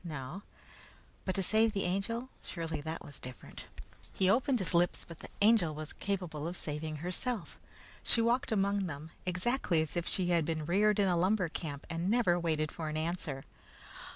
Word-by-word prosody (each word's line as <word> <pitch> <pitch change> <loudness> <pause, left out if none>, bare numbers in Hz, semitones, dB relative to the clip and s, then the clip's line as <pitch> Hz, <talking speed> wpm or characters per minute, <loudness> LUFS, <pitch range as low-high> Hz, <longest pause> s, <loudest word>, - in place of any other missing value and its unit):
No. 155 +2 -5 0.8
But 185 - -1
to 195 - +1
save 220 +3 +4
the 195 - 0
Angel 230 +7 -1
surely 160 -3 -4
that 160 +2 -5
was 145 - -8
different. 125 -1 -9 0.5
He 190 0 +3
opened 260 +3 +3
his 190 -5 +1
lips, 175 0 +2
but 170 -2 -10
the - - -9
Angel 205 -8 +5
was 155 0 -6
capable 175 -6 -2
of 175 +1 -4
saving 155 +1 -3
herself. 185 - -3 0.4
She - - +3
walked 235 +2 +2
among 200 -2 +2
them, 155 0 -7 0.2
exactly 180 0 +2
as 155 +1 -1
if 170 -1 -1
she 180 -2 +1
had 170 -2 +4
been 155 -1 -2
reared 205 +5 +3
in 200 -2 +4
a 180 - +3
lumber 185 +1 +2
camp, 150 -3 -5
and 170 +2 -1
never 210 -7 +3
waited 155 -2 0
for 160 -2 -4
an 155 - -2
answer. 155 -4 -2
175 Hz, 180 wpm, -33 LUFS, 160-200 Hz, 0.8 s, Angel